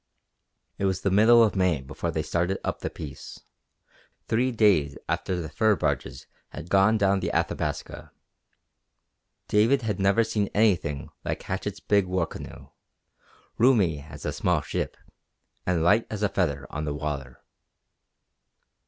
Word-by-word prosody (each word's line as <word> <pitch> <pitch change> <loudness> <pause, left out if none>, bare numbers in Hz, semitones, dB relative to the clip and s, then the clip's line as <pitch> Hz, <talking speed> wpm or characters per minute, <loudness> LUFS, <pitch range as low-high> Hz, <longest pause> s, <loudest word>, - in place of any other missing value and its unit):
It 100 - 0
was 95 -1 0
the 100 - 0
middle 115 +4 +6
of 110 - +1
May 90 -5 +2
before 65 - -5
they - - -2
started 90 +3 -1
up - - -3
the - - -3
Peace, 70 -3 -9 0.9
three 125 +3 +1
days 100 - +3
after 90 -1 -1
the 80 - -4
fur 110 +4 +2
barges - - -2 0.2
had 80 +3 -9
gone 100 +3 +4
down 100 -1 +2
the - - -2
Athabasca. - - -3 1.4
David 115 +5 +3
had 105 -3 -2
never 100 +4 +3
seen 110 -3 -1
anything 90 -10 +1
like - - -3
Hatchett's 100 +1 -4
big 100 -2 +2
war 90 -2 0
canoe, - - -10 0.9
roomy 105 - +3
as 75 0 -11
a - - -2
small 90 -4 +1
ship, 70 - -4 0.7
and 85 -3 +1
light 105 +7 +3
as 105 -1 -4
a 105 - +3
feather 75 -9 -1
on 75 +1 -4
the 75 -1 -3
water. 70 -4 -5
95 Hz, 145 wpm, -26 LUFS, 80-105 Hz, 1.4 s, middle